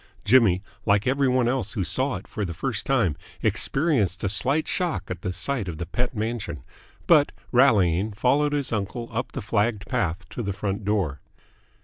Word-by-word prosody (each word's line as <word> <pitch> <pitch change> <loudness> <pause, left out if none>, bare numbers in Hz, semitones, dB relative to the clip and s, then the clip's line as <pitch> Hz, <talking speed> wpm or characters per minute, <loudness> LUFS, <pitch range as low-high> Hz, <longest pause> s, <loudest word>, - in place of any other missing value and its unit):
Jimmy, 105 -6 +5 0.2
like 100 +2 +2
every 135 +2 +2
one 125 -1 +2
else 125 -4 -1
who 100 - -1
saw 130 +6 0
it 95 - -8
for 105 - -4
the 85 -3 -4
first 125 0 -2
time, 115 - +2 0.3
experienced 125 - +1
a 100 - +1
slight 135 +10 +2
shock 175 - -1
at 90 -1 -5
the 90 - -2
sight 100 +5 -2
of 85 -3 -5
the 85 - -4
Pett 125 +7 -2
mansion, 110 - -3 0.4
but, 150 -4 +5 0.2
rallying, 105 -7 +4
followed 140 +7 +2
his 140 -4 -1
uncle 110 +3 -3
up 115 +3 -3
the 130 - -4
flagged 105 0 0
path 90 -7 -1
to - - -5
the 100 -3 -2
front 100 +1 -3
door. 95 -9 0
110 Hz, 180 wpm, -25 LUFS, 95-130 Hz, 0.4 s, Jimmy